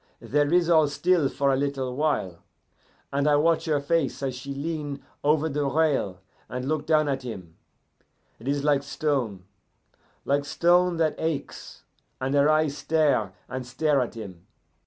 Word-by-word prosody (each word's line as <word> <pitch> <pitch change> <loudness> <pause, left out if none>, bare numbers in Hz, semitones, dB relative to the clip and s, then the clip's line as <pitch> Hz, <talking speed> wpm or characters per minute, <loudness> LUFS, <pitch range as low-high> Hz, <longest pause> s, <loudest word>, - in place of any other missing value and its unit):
"There 145 +1 0
is 175 -1 +4
all 160 -3 +5
still 150 +1 +2
for 140 -1 +1
a - - +3
little 135 -2 -2
while, 130 - -1 0.7
and 140 +1 +1
I 150 - +5
watch 165 +3 +2
her 155 -3 +1
face 140 -1 -1
as 135 -1 -1
she 130 +3 -7
lean 145 -1 -4 0.2
over 150 +2 +3
the 145 -1 -1
rail 135 - 0 0.3
and 125 +1 -4
look 155 0 -1
down 155 -1 +3
at 135 -1 -1
him; 95 -10 -8 0.8
it 115 - -10
is 140 0 0
like 145 -2 +3
stone, 135 -9 -2 0.8
like 140 +1 +1
stone 175 +4 +3
that 160 -2 +2
aches, 160 -3 -4 0.4
and 130 +1 -2
her 145 +1 +4
eyes 155 -2 +2
stare 140 -8 +1
and 130 0 -5
stare 135 +3 +1
at 125 - -4
him. 95 -6 -9
145 Hz, 160 wpm, -26 LUFS, 130-155 Hz, 0.8 s, all